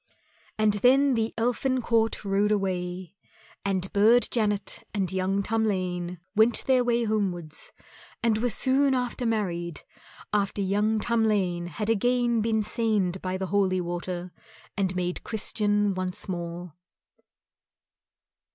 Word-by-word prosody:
And 215 -1 +3
then 260 +6 +4
the 225 -1 0
Elfin 250 +3 0
court 225 -3 0
rode 200 +1 +2
away, 185 -3 -2 0.5
and 190 -1 -2
Burd 225 +4 +5
Janet 210 -4 -1
and 190 -3 0
young 190 +1 0
Tamlane 185 -5 -1 0.2
went 220 +2 +3
their 255 -2 +4
way 240 -1 +1
homewards 185 -8 -2 0.5
and 220 -2 +2
were 245 +2 +1
soon 265 +4 +2
after 250 -1 -2
married 175 -7 -2 0.5
after 205 -1 0
young 205 +3 +1
Tamlane 210 -7 +1
had 210 +7 -2
again 240 +1 +2
been 220 -1 +1
sained 205 -5 0
by 185 0 -2
the 190 - -3
holy 190 -2 +2
water 175 0 -4 0.4
and 190 -2 -1
made 180 0 -2
Christian 205 -2 0
once 185 -1 -2
more. 175 -2 -5
205 Hz, 125 wpm, -26 LUFS, 185-225 Hz, 0.5 s, Burd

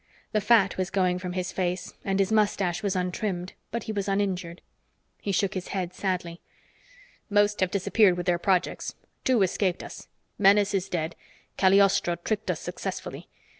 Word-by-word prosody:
The 215 - +1
fat 210 -3 +4
was 185 -1 -1
going 185 -2 +1
from 180 -1 -5
his 185 0 -2
face, 180 0 -2
and 195 -1 0
his 195 +1 +1
mustache 200 -5 +1
was 200 -2 -1
untrimmed, 180 0 -2 0.2
but 235 -1 -3
he - - -4
was 205 -1 -2
uninjured. 190 -4 -1 0.6
He 200 - -2
shook 195 +1 +1
his 185 -1 -4
head 185 -2 -3
sadly. 180 -3 -3 0.9
"Most 205 0 +3
have 185 - +2
disappeared 200 0 +3
with 175 - -3
their 175 -2 +2
projects. 185 -1 0 0.3
Two 245 -6 +3
escaped 185 0 0
us. - - -10 0.3
Menes 205 0 +5
is 195 -1 -1
dead. 165 -1 -2 0.4
Cagliostro 190 -2 +4
tricked 210 +5 -3
us - - -1
successfully. - - -5
190 Hz, 165 wpm, -27 LUFS, 180-205 Hz, 0.9 s, Menes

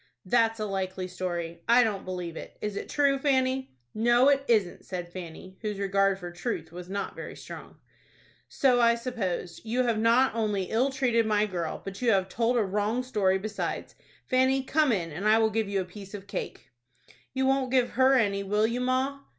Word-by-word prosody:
"That's 225 +2 +2
a 215 - -1
likely 190 -2 -3
story. 175 -2 -4
I 245 +1 +7
don't 210 -4 -2
believe 180 -3 -5
it. - - -9
Is 210 -1 -4
it - - -5
true, 280 -2 +2
Fanny?" 265 - 0 0.2
"No, 240 +4 +4
it 275 -1 +3
isn't," 210 -7 +1
said 175 -2 -6
Fanny, 185 +1 -9
whose 210 -3 -3
regard 195 0 +2
for 175 -2 -7
truth 175 -4 -4
was 180 +1 -9
not 200 +1 -4
very - - -7
strong. - - -10 0.7
"So 255 -3 +3
I 235 0 +5
supposed. 210 -8 -4
You 240 +3 0
have 230 -3 +1
not 235 +4 +4
only 210 -4 0
ill 245 +5 +2
treated 245 -4 +1
my 210 -1 +2
girl, 175 -5 -4
but 195 +2 -7
you 245 - +2
have 190 -1 +1
told 235 +3 +1
a 225 - +3
wrong 210 +5 -1
story 200 -7 +1
besides. 210 +2 -4 0.3
Fanny, 260 +1 +2
come 300 0 +2
in, 170 -7 -1
and 185 +8 -3
I 215 +1 +6
will 220 -1 +3
give 220 -1 -1
you 195 -1 0
a - - -5
piece 195 +2 -10
of 200 -1 -9
cake." 170 -8 -6 0.6
"You 265 0 +1
won't 265 -1 +2
give 250 -1 +2
her 260 +2 +4
any, 200 -5 +2
will 210 +2 +1
you, 235 +2 -1
ma?" 260 +2 0
215 Hz, 200 wpm, -28 LUFS, 190-250 Hz, 0.7 s, I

